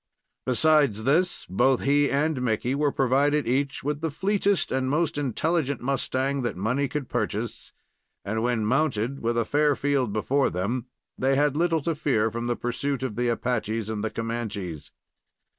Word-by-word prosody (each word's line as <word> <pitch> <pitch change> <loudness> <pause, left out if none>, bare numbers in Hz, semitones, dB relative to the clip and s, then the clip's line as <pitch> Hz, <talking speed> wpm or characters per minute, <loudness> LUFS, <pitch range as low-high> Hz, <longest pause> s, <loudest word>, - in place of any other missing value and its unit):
Besides 135 -4 +3
this, 165 +8 +1
both 125 +8 +2
he 145 +1 +3
and 145 -1 0
Mickey 120 +1 0
were 145 0 +1
provided 140 +3 +2
each 135 +3 0
with 145 +1 -2
the 160 - 0
fleetest 195 +3 0
and 130 0 0
most 155 +2 +1
intelligent 145 +1 0
mustang 135 +1 -1
that 120 -7 -3
money 125 +9 0
could 140 -1 -4
purchase, - - -3 0.5
and 110 +3 -1
when 120 -2 0
mounted 125 -2 +1
and 140 - -9
with 115 +1 -1
a 115 - +2
fair 150 0 +2
field 140 -5 0
before 135 +7 +1
them, 110 +8 -2 0.3
they 135 +1 +2
had 145 0 +2
little 165 0 +2
to 165 - 0
fear 130 -8 +1
from 115 +1 -3
the 120 - 0
pursuit 130 +3 -2
of 130 -6 -3
the 120 0 0
Apaches 115 -2 -1
and 105 -1 -3
Comanches. 110 -8 -4
130 Hz, 165 wpm, -26 LUFS, 115-145 Hz, 0.5 s, Besides